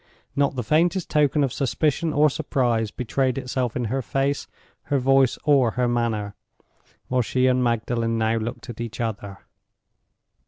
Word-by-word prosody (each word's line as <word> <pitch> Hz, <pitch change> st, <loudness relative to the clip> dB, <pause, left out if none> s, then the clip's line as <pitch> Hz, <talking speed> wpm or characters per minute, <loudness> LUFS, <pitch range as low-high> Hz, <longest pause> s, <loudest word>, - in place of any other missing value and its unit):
Not 140 Hz, -1 st, +1 dB
the 125 Hz, -, -2 dB
faintest 170 Hz, -, +1 dB
token 150 Hz, -1 st, +3 dB
of 135 Hz, -, -1 dB
suspicion 155 Hz, +4 st, 0 dB
or 150 Hz, +1 st, +4 dB
surprise 125 Hz, -7 st, 0 dB
betrayed 130 Hz, +3 st, -1 dB
itself 125 Hz, -3 st, -2 dB
in 125 Hz, -, -1 dB
her 130 Hz, +5 st, -1 dB
face, 135 Hz, +3 st, -1 dB, 0.4 s
her 145 Hz, -, +1 dB
voice, 135 Hz, 0 st, +3 dB
or 135 Hz, -7 st, +3 dB
her 125 Hz, -1 st, +2 dB
manner, 115 Hz, -4 st, -1 dB, 0.7 s
while 125 Hz, 0 st, +1 dB
she 130 Hz, +2 st, 0 dB
and 130 Hz, -1 st, +3 dB
Magdalen 115 Hz, -1 st, 0 dB
now 110 Hz, 0 st, +1 dB
looked 115 Hz, 0 st, -5 dB
at 115 Hz, -, -9 dB
each 115 Hz, -1 st, -6 dB
other. 105 Hz, -4 st, -4 dB
125 Hz, 155 wpm, -24 LUFS, 115-140 Hz, 0.7 s, or